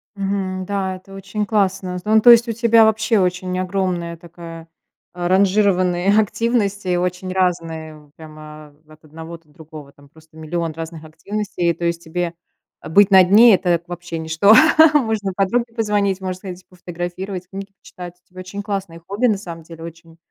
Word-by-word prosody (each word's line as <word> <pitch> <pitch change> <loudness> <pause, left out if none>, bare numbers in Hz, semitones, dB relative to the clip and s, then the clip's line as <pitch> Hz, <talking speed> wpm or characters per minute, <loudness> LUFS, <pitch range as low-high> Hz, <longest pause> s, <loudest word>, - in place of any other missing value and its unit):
Мгм. 195 -1 -3
Да, 190 -1 -3
это 195 +1 -16
очень 195 +2 -4
классно. 195 -3 -1
З 180 - -10
ну, 220 +1 +4
то 240 - +8
есть, 235 0 +6
у - - -1
тебя 230 0 +4
вообще 220 0 +1
очень 185 0 -1
огромная 180 -2 -2
такая, 165 -1 -11 0.5
а, 175 0 -3
ранжированные 190 0 +2
активности, 205 -4 -1
очень 180 +1 -3
разные. 165 -4 -2
Вот 150 -1 -21
прямо 155 -1 -13
от 155 +1 -19
одного 160 +2 -10
до 160 -2 -32
другого, 155 -2 -13
там 140 0 -21
просто 160 0 -21
1000000 165 +1 -3
разных 165 0 -8
активностей. 175 +2 -3
То 170 +1 -5
есть, 170 0 -2
тебе 175 +1 -3 0.5
быть 200 +5 +4
на 190 -1 +8
дне- 210 +4 +7
это 175 -2 +1
п 170 - -23
вообще 175 -1 -7
ничто. 160 +6 +3 0.4
Можно 220 -8 0
подруге 230 +4 0
позвонить, 205 -4 0
можно 185 -1 -3
сходить 185 -1 -10
пофотографировать, 180 +1 -7
книги 195 +1 -8
почитать. 175 -1 -11
У - - -40
тебя 185 0 -13
очень 190 +2 -7
классные 195 -5 -5
хобби, 205 +7 0
на 210 -4 +1
самом 170 -4 -9
деле, 165 0 -12
очень, 165 0 -12
180 Hz, 170 wpm, -19 LUFS, 165-200 Hz, 0.5 s, то